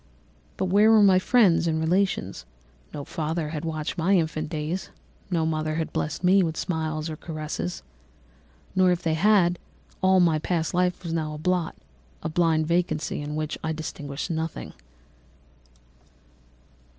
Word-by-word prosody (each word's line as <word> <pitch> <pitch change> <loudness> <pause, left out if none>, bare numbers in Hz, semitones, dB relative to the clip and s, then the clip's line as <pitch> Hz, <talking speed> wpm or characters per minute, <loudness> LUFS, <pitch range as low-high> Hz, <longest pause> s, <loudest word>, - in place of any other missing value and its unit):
"But 190 - 0
where 205 +4 +5
were 220 -2 +6
my 190 -2 +6
friends 185 -6 +4
and 160 -1 0
relations? 160 - 0 0.4
No 145 - -6
father 160 0 -3
had 155 -1 -5
watched 160 +1 -3
my 190 +4 +3
infant 155 -2 -1
days, 160 +3 -3 0.4
no 165 -4 +1
mother 155 -1 -1
had 160 0 -3
blessed 155 +4 -3
me 190 +2 +5
with 160 -3 -1
smiles 160 -3 -2
and 155 -2 -6
caresses; 150 - -5 0.9
or 185 -1 +5
if 175 - -1
they 160 - +1
had, 180 0 +3 0.4
all 190 0 +5
my 165 -3 +3
past 165 +1 -1
life 180 0 0
was 165 -2 -4
now 155 -2 -2
a - - -6
blot, 180 +1 -1 0.5
a - - -2
blind 160 -1 +2
vacancy 165 -3 -1
in 145 +1 -5
which 155 -1 -3
I 160 0 -1
distinguished 150 0 -5
nothing. 160 0 -4
160 Hz, 150 wpm, -25 LUFS, 155-180 Hz, 0.9 s, were